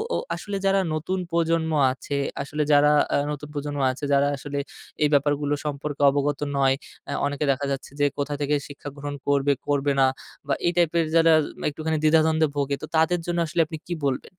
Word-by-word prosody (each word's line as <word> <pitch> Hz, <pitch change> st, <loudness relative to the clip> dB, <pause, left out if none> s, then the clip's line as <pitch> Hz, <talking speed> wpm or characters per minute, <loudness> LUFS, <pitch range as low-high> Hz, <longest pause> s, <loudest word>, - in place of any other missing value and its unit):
অ -, -, +1 dB, 0.2 s
আসলে 205 Hz, -1 st, -5 dB
যারা 195 Hz, 0 st, +4 dB
নতুন 165 Hz, +5 st, -2 dB
প্রজন্ম 165 Hz, -1 st, +1 dB, 0.2 s
আছে, 140 Hz, +2 st, -4 dB, 0.2 s
আসলে 150 Hz, +2 st, -2 dB
যারা 145 Hz, 0 st, +6 dB, 0.2 s
আ -, -, +3 dB, 0.2 s
নতুন 150 Hz, 0 st, -6 dB
প্রজন্ম 145 Hz, 0 st, -4 dB
আছে, 130 Hz, +3 st, -10 dB
যারা 140 Hz, 0 st, +4 dB
আসলে 145 Hz, +1 st, -6 dB, 0.5 s
এই 150 Hz, -, +4 dB
ব্যাপারগুলো 145 Hz, 0 st, +2 dB
সম্পর্কে 145 Hz, 0 st, -4 dB
অবগত 145 Hz, 0 st, 0 dB, 0.2 s
নয়। 135 Hz, -1 st, +3 dB, 0.3 s
আ -, -, -3 dB
অনেকে 145 Hz, +1 st, -1 dB
দেখা 135 Hz, +1 st, -2 dB
যাচ্ছে 135 Hz, 0 st, -4 dB
যে, 145 Hz, -, +4 dB
কোথা 145 Hz, 0 st, -2 dB
থেকে 145 Hz, +1 st, +1 dB
শিক্ষা 145 Hz, 0 st, -8 dB
গ্রহণ 145 Hz, 0 st, -5 dB
করবে, 140 Hz, 0 st, +3 dB, 0.2 s
করবে 145 Hz, 0 st, +1 dB
না, 135 Hz, -, +6 dB, 0.4 s
বা 140 Hz, -, +1 dB
এই -, -, +3 dB
টাইপের 170 Hz, -1 st, +3 dB
যারা 165 Hz, 0 st, +6 dB, 0.4 s
একটুখানি 155 Hz, +1 st, -2 dB
দ্বিধাদ্বন্দ্বে 160 Hz, 0 st, +4 dB
ভোগে, 140 Hz, -1 st, 0 dB
তো -, -, -4 dB
তাদের 160 Hz, +2 st, +3 dB
জন্য 175 Hz, 0 st, -2 dB
আসলে 170 Hz, +2 st, +1 dB
আপনি 160 Hz, +1 st, -7 dB
কি 175 Hz, -, -2 dB
বলবেন? 130 Hz, -2 st, -3 dB
145 Hz, 190 wpm, -24 LUFS, 140-160 Hz, 0.5 s, যারা